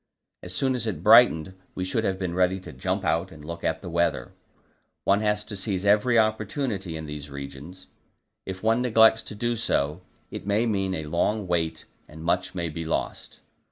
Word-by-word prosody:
As 90 - -7
soon 130 +6 +1
as 120 -3 -2
it 105 - -4
brightened, 80 +3 +6 0.2
we 95 - -2
should 110 +4 -1
have 95 - +1
to 95 -1 -2
be 85 - -4
ready 90 +1 +2
to - - -9
jump - - -2
out 85 +3 0
and 75 -3 -12
look 85 +1 -7
at - - -1
the - - -6
weather; 85 0 0 0.7
one 100 +2 +3
has 105 -1 +1
to 105 - -7
seize 95 -1 -2
every 105 +4 +4
opportunity 110 - 0
in 80 - -6
these 75 -1 -7
regions. 70 +6 -9 0.6
If 95 0 -7
one 115 +2 +3
neglects 110 -2 +5
to 105 - -8
do 120 +3 -1
so, 75 -7 0 0.3
it - - -7
may 105 +3 +2
mean 95 -4 0
a 80 - -4
long 90 +7 0
wait 85 -2 -1 0.2
and 80 +1 -10
much 85 +2 0
may 85 -2 -2
be 85 +1 -5
lost. 80 - -4
95 Hz, 195 wpm, -26 LUFS, 85-110 Hz, 0.7 s, brightened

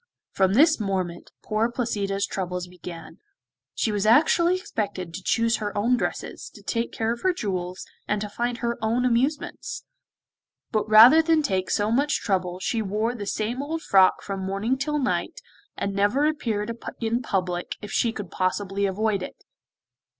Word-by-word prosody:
From 190 0 +2
this 310 +3 +5
moment 185 -4 -3
poor 215 +2 0
Placida's 200 -5 -1
troubles 180 -1 -3
began! 175 -2 -10 0.6
She 220 - 0
was 205 0 0
actually 335 +8 +5
expected 200 - -4
to 190 - -6
choose 230 +2 +2
her 205 -1 -4
own 235 +5 +3
dresses, - - -4
to - - -14
take 230 0 -2
care 225 0 -1
of 235 - -9
her 375 - +3
jewels, 185 - -4 0.2
and 210 - 0
to 210 - -3
find 240 +3 -2
her 235 0 -2
own 230 +3 +1
amusements; 255 +5 -1 0.9
but 215 -1 -1
rather 235 +9 +9
than 320 -1 +2
take 190 -8 -1
so 210 +1 +1
much 285 +5 +2
trouble 185 -3 -1
she 225 +4 -1
wore 215 +3 -1
the 205 -5 -6
same 225 +6 -2
old 320 +3 -4
frock 190 -1 +4
from 195 -1 -4
morning 195 +6 -1
till 295 +3 -1
night, 265 -3 -1 0.4
and 200 0 -2
never 205 +9 +2
appeared 230 -7 -1 0.2
in 230 +1 0
public 180 -5 -2
if 210 - -7
she 235 - +2
could 205 -3 -7
possibly 195 +2 -1
avoid 200 +1 0
it. - - -8
215 Hz, 165 wpm, -25 LUFS, 195-240 Hz, 0.9 s, rather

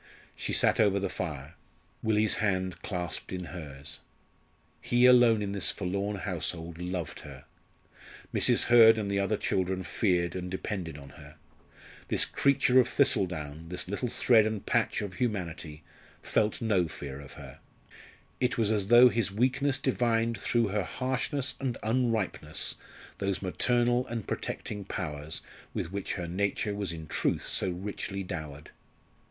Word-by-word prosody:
She - - -4
sat - - +4
over 100 -2 +4
the 100 -1 -2
fire, 75 -4 -5 0.5
Willie's 110 -1 +2
hand 95 -3 -1
clasped 90 -4 -4
in 90 -1 -4
hers. 70 -4 -7 0.8
He 120 +1 +3
alone 120 -4 +6
in 100 - -3
this 100 -1 +2
forlorn 100 +2 -2
household 85 -3 -4
loved 90 -4 -4
her. - - -11 0.9
Mrs. - - +4
Hurd 115 -2 +7
and 100 -2 -2
the 100 - +1
other 100 +2 +1
children 95 -1 -1
feared 90 -6 0
and 90 -1 -4
depended 90 -4 -4
on 70 -1 -11
her. 70 +1 -13 0.7
This - - +3
creature 130 -2 +3
of 125 - +4
thistle 125 -7 +3
down 80 -1 -7
this 90 +1 -5
little 100 +6 -2
thread 115 -1 +4
and 110 -2 -4
patch - - +1
of 100 -3 -5
humanity 85 -9 -3 0.4
felt 105 +2 0
no 95 -6 +2
fear 70 -3 -8
of 70 - -12
her. - - -11 0.8
It 125 0 0
was 110 -2 +2
as 105 -3 0
though 120 +3 +8
his 115 -4 0
weakness 130 +5 +1
divined 115 -3 +1
through 115 -3 +1
her 105 +1 0
harshness 130 - -2
and 130 -4 -2
unripeness 110 -9 0 0.5
those 100 0 -1
maternal 120 +5 +1
and 115 -3 -4
protecting 105 -1 -4
powers 75 -6 -5 0.3
with 80 - -3
which 100 0 -3
her 90 -4 -4
nature 100 +4 -1
was 100 -4 -2
in 80 -1 -7
truth - - -1
so - - 0
richly 95 +1 -4
dowered. 80 -5 -7
100 Hz, 150 wpm, -29 LUFS, 85-115 Hz, 0.9 s, though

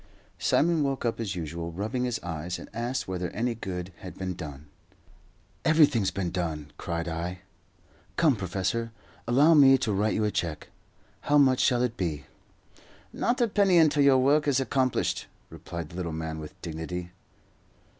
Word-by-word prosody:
Simon 165 0 +2
woke 135 -3 -1
up 115 - -1
as 100 -4 -3
usual, 85 0 -5
rubbing 110 +8 -2
his 125 -2 -2
eyes, 85 +1 -4
and - - -11
asked 120 +3 -2
whether 90 -2 -3
any 120 +2 -1
good 90 -4 -6
had 90 - -10
been 95 -1 -3
done. 75 -3 -8 1.0
"Everything's 145 -10 +4
been 90 -3 -3
done," 80 -5 -3
cried 85 0 -3
I. 85 +2 -4 0.8
"Come, 155 -6 +4
professor, 100 +4 -2 0.4
allow 140 +7 +5
me 135 -3 +7
to 110 -4 -1
write 105 +2 +1
you 110 - +1
a 105 - 0
cheque. 80 -6 -3 0.5
How 145 - +3
much 130 -3 +5
shall 125 -1 +3
it 120 -1 -2
be?" 80 -6 -3 0.9
"Not 245 +1 0
a 240 - +4
penny 200 -4 +3
until 155 -3 +5
your 140 -2 +6
work 145 +3 +3
is 135 -2 +3
accomplished," 130 -1 0 0.2
replied 85 -3 -7
the 85 - -10
little 85 -3 -3
man, 80 0 -4
with 75 -1 -10
dignity. 85 +2 -5
100 Hz, 165 wpm, -27 LUFS, 85-135 Hz, 1.0 s, me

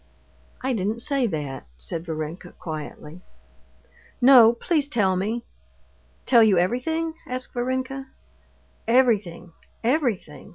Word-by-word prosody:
"I 260 0 0
didn't 220 +2 -2
say 275 -4 +1
that," 145 - -5
said 160 - -6
Varenka 160 +2 -5
quietly. 155 +1 -8 1.0
"No, 245 -3 +8
please 290 +5 0
tell 205 -9 +1
me!" 215 +6 -2 0.8
"Tell 240 -3 +6
you 210 -4 +5
everything?" 315 - 0
asked 255 0 -4
Varenka. 260 +2 -3 0.8
"Everything, 210 -8 +2 0.3
everything!" 235 - -1
230 Hz, 100 wpm, -24 LUFS, 175-255 Hz, 1.0 s, No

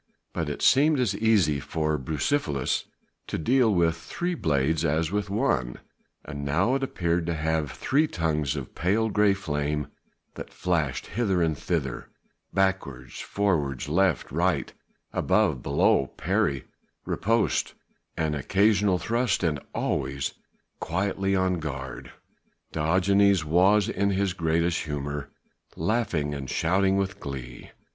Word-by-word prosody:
But 80 -2 -2
it 75 - -4
seemed 145 +2 +5
as 110 -6 +1
easy 100 -10 +3
for 80 +2 -1
Bucephalus 75 - -1 0.4
to - - -3
deal 120 - +3
with 85 -4 +2
three 175 - -3
blades 80 - +1
as 80 +2 +1
with 105 0 -1
one: 65 - 0 0.5
now 70 - 0
it 135 - 0
appeared 85 -9 -1
to 85 - 0
have 80 -2 0
three 150 +4 +1
tongues 75 - -1
of - - -6
pale 105 +6 +1
grey 105 -1 +3
flame 75 -5 -2 0.4
that - - -8
flashed 80 -8 -1
hither 95 -4 0
and 80 -2 +1
thither 70 -5 -3 0.4
backwards, 95 -10 -1
forwards, 80 -11 -1
left, 85 -2 +1
right, - - 0 0.4
above, 65 - +2
below, 70 0 +2
parry, 70 0 -1 0.4
riposte, 115 +1 0 0.4
an 80 -1 0
occasional 100 +6 +2
thrust, 115 +1 0
and 75 -4 +1
always 70 -1 -2 0.5
quietly 95 +3 -1
on 95 -2 +1
guard. 65 -4 -6 0.6
Diogenes 95 +3 +3
was 95 +6 +4
in 100 -3 0
his 100 -1 0
greatest 85 0 0
humour 70 -1 -4 0.5
laughing 85 -6 0
and 70 -2 -5
shouting 95 +3 +2
with 95 0 -2
glee. 65 -3 -7
85 Hz, 125 wpm, -26 LUFS, 75-100 Hz, 0.6 s, seemed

